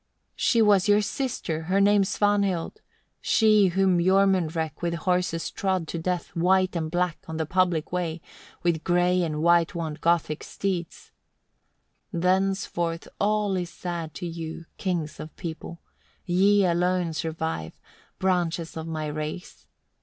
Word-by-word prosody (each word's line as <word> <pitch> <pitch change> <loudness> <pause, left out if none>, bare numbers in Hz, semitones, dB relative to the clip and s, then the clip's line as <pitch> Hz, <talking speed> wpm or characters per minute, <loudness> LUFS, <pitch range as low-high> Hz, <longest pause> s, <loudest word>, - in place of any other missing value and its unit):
3. - - -49
"She 230 - +3
was 205 -2 +4
your 205 +1 +5
sister, 220 - -3
her 190 +3 +2
name 200 0 +5
Svanhild, 200 - 0 0.4
she 215 -3 +4
whom 185 0 +2
Jormunrek 180 -4 +2
with 170 -1 -1
horses 180 -1 -1
trod 185 -4 -1
to 170 - -3
death, 180 +1 -2
white 185 +2 +2
and 160 -2 -2
black, 175 0 -1
on 160 - -5
the 160 - -1
public 175 -2 +1
way, 175 -2 -2 0.4
with 170 -2 +1
grey 180 +1 +2
and 155 -2 -2
way 170 0 +5
wont 160 -2 -4
Gothic 165 -3 +1
steeds. 180 -4 -4 1.0
4. 170 - -2
"Thenceforth 185 -2 0
all 210 -1 +1
is 180 -2 -2
sad 170 -2 -5
to - - -5
you, 165 -1 -6
kings 175 -5 -2
of 155 - -8
people! 170 0 -7 0.4
Ye 195 +2 +4
alone 175 -1 +1
survive, 160 - -3
5. - - -38 0.4
"Branches 175 -3 0
of 160 0 -5
my 155 -1 -3
race. 155 +4 -6
175 Hz, 145 wpm, -26 LUFS, 165-190 Hz, 1.0 s, your